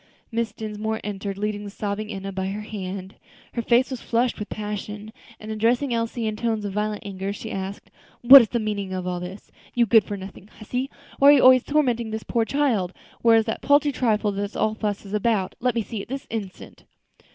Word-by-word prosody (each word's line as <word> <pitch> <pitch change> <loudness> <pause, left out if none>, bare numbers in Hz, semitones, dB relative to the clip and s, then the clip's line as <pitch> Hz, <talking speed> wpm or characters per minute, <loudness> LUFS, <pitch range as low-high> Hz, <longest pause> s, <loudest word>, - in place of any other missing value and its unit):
Mrs. 225 -2 -1
Dinsmore 220 0 -3
entered, 200 -1 -4
leading 210 0 -2
the 205 - -6
sobbing 210 +1 -4
Enna 195 -1 -5
by 190 0 -3
the - - -2
hand; 195 -2 -6 0.4
her 235 - -1
face 240 +3 +3
was 255 - -4
flushed 240 0 0
with 210 - -5
passion, 210 0 -5 0.3
and 215 0 -7
addressing 240 +5 +1
Elsie 230 0 -2
in 215 -1 -1
tones 220 -1 -1
of 200 - -4
violent 210 0 -2
anger, 195 0 -4
she 220 +2 -7
asked, 195 +1 -6 0.3
"What 265 +3 +11
is 225 - -1
the 240 - 0
meaning 205 -4 -3
of 185 -1 -3
all 180 -1 -2
this, 180 +3 -9 0.2
you 240 -1 +4
good 225 -1 +5
for 205 +1 -5
nothing 190 0 -10
hussy? 250 +5 -4 0.3
Why 280 - +8
are - - +10
you 280 - +5
always 255 -1 +7
tormenting 245 -6 +1
this 220 0 -4
poor 230 -2 0
child? 225 -10 0 0.3
Where 230 -1 +6
is 220 - +2
that 225 - -3
paltry 285 +1 +4
trifle 220 -5 +1
that 200 +1 -4
all 215 - +1
this 220 - -13
fuss 205 -1 -2
is 200 - -9
about? 210 -3 +1
let 250 0 0
me 230 - 0
see 215 -1 -5
it - - -10
this 270 +1 -5
instant." 205 -5 -7
215 Hz, 220 wpm, -24 LUFS, 200-235 Hz, 0.4 s, What